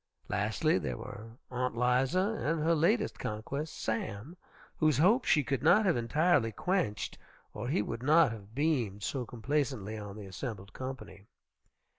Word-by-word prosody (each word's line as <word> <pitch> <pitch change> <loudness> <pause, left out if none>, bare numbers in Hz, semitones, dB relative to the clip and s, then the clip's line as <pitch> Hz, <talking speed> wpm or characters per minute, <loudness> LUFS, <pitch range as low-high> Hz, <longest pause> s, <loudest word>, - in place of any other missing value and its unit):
Lastly, - - +1
there 60 -2 -3
were 115 +3 -9
Aunt 125 -1 -2
'Liza 125 +7 +2 0.2
and 160 +2 +1
her 165 +1 +3
latest 205 +8 +2
conquest, 140 +8 -4
Sam, 110 - -3 0.4
whose 155 -5 +3
hopes 210 - +4
she 150 - +5
could 135 +1 -1
not 210 +9 +5
have 185 - +3
entirely 125 +1 +2
quenched 175 - -1 0.3
or 110 +3 -5
he 125 -6 +1
would 115 - -5
not 155 +1 +5
have 110 0 -10
beamed 125 -10 0
so 125 -1 -2
complacently 125 -4 -2
on 100 -1 -7
the 105 - -8
assembled 100 +1 -6
company. 130 -6 -7
125 Hz, 150 wpm, -31 LUFS, 110-155 Hz, 0.4 s, she